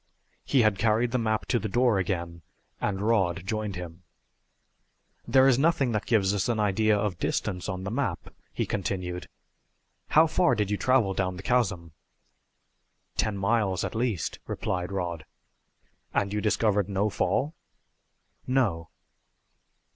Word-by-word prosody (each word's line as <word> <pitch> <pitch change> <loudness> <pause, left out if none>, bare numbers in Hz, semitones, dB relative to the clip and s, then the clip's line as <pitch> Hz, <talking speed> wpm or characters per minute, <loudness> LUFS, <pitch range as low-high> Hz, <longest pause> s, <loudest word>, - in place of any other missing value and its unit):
He 130 -4 +3
had 105 -3 +2
carried 115 +3 +2
the 125 - +1
map 110 -1 0
to 120 - +2
the 110 - -4
door 120 -1 +3
again, 85 -2 -3 0.4
and 100 -1 -2
Rod 95 -5 +1
joined 105 -1 -3
him. 90 -1 -8 1.3
"There 130 0 +5
is 130 -1 +4
nothing 140 -4 +2
that 105 -1 -2
gives 100 -4 +3
us 100 +3 0
an 115 -2 0
idea 105 +1 +2
of 100 -4 -2
distance 90 +1 -2
on 95 0 -4
the 95 - -4
map," 115 -7 -3 0.2
he - - -2
continued. 90 -3 -3 0.8
"How 160 +2 +6
far 170 +2 +2
did 105 -1 -1
you 105 - +1
travel 125 -6 +2
down 95 -1 -1
the 95 - -9
chasm?" 95 -10 0 1.2
"Ten 105 -2 0
miles, 100 -2 +1
at - - -3
least," 115 - -2
replied 90 +1 -3
Rod. 85 -4 -3 0.9
"And 100 0 +1
you 105 - -1
discovered 105 -2 +1
no 100 +2 0
fall?" 145 +9 0 0.9
"No." 100 -11 0
105 Hz, 145 wpm, -27 LUFS, 95-115 Hz, 1.3 s, How